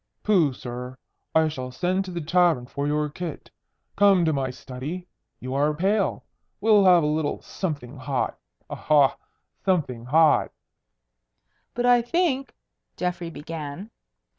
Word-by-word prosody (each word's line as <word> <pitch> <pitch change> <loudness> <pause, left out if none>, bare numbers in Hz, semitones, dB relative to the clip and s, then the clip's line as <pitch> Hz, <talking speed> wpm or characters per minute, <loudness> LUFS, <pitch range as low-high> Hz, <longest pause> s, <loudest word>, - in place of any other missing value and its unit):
"Pooh, 180 -9 +3
sir! 125 0 -7 0.4
I 160 0 +5
shall 130 -5 -5
send 180 +9 -1
to 185 - -7
the 175 -1 -4
tavern 165 -5 +2
for 140 +3 -3
your 150 0 0
kit. 160 +1 -7 0.4
Come 195 -4 +5
to 160 - +2
my 135 -2 -1
study. 135 +8 -7 0.3
You 130 +1 -5
are 145 +2 +1
pale. 195 +5 0 0.3
We'll 210 -2 +5
have 180 -3 +6
a - - +1
little 150 0 -1
something 145 -8 -5
hot. 130 0 -2 0.3
Aha! 145 -3 +3 0.5
Something 145 -11 0
hot!" 155 +4 +4 1.2
"But 245 +1 0
I 245 -1 +6
think 275 0 0 0.2
" - - -54
Geoffrey 180 -1 -2
began. 160 +5 -7
160 Hz, 140 wpm, -25 LUFS, 140-185 Hz, 1.2 s, have